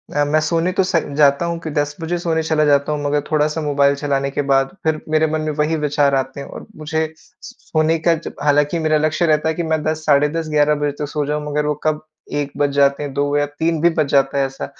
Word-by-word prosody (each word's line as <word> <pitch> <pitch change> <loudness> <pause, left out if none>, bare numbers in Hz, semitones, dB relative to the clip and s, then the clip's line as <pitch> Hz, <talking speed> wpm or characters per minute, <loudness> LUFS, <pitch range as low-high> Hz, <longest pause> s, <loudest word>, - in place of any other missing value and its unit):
अ, 145 - +3
मैं 155 +2 +2
सोने 165 +3 0
तो 190 - +1
स 185 - -2 0.2
जाता 145 +2 +4
हूँ 170 0 -3
कि 160 - -4
10 145 0 -1
बजे 175 +2 -2
सोने 165 -2 -1
चला 155 -1 +1
जाता 145 0 +2
हूँ 145 -1 -2
मगर 145 0 +1
थोड़ा-सा 155 +1 +1
मोबाइल 140 -1 +2
चलाने 140 -1 -1
के 145 - -1
बाद 135 +6 +2
फिर 160 -1 0
मेरे 155 0 +2
मन 155 0 -1
में 155 0 -2
वही 155 +2 +1
विचार 145 -2 +1
आते 135 +1 -2
हैं 140 - -7
और - - -10
मुझे 160 +1 -3
स - - -24
स - - -10 0.2
सोने 160 +1 +2
का 170 +1 +3
जब 160 - -8
हालाँकि 145 +3 +2
मेरा 155 -1 +2
लक्ष्य 155 +3 +1
रहता 155 -1 +2
है - - 0
कि 170 - -2
मैं 160 -1 0
10 155 0 -2
साढ़े 145 0 +4
10-11 150 -2 +1
बजे 145 0 -1
तक 150 - -1
सो 150 0 -2
जाऊँ 150 +1 -2
मगर 150 0 0
वो 150 - +1
कब 155 -1 0 0.4
1 140 -1 -3
बज 145 0 +2
जाते 140 0 +2
हैं, 140 -2 -5
2 145 +1 0
या 145 - +2
3 160 +3 -2
भी 170 - +5
बज 155 -2 0
जाता 140 0 +2
है 135 - +2
ऐसा, 135 0 -6
150 Hz, 260 wpm, -19 LUFS, 145-160 Hz, 0.4 s, भी